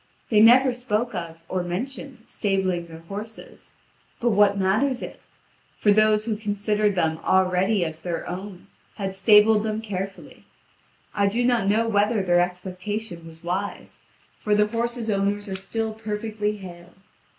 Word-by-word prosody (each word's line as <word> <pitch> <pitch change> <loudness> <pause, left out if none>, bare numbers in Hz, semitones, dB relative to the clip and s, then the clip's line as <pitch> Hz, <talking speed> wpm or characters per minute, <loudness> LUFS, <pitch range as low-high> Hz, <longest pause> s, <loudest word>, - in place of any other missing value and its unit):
They 215 - +5
never 250 +4 +7
spoke 240 -1 -2
of, 165 -1 -6
or 185 - -1
mentioned, 250 +8 -5
stabling 190 -4 -1
their 165 0 -11
horses. 205 +6 -8 0.4
But 240 -1 +2
what 205 -1 +4
matters 220 +8 +1
it? - - -10 0.5
For 205 - +3
those 215 0 +4
who 225 -2 -1
considered 210 -1 0
them 160 -2 0
already 190 +1 +2
as 160 0 -6
their 175 -2 -4
own 185 0 -7 0.3
had 195 -2 -3
stabled 210 +2 +5
them 215 0 -2
carefully. 195 -3 -6 0.7
I 200 -1 +2
do 235 +5 0
not 240 -5 +2
know 220 +3 +2
whether 210 0 +2
their 175 -1 +3
expectation 180 +1 -4
was 165 +1 -14
wise, 190 +4 -4 0.4
for 210 -1 +1
the 210 0 +4
horses' 230 +1 -2
owners 200 +1 0
are 190 - -4
still 220 +4 -3
perfectly 210 -1 -3
hale. 175 -2 -12
205 Hz, 150 wpm, -24 LUFS, 185-220 Hz, 0.7 s, never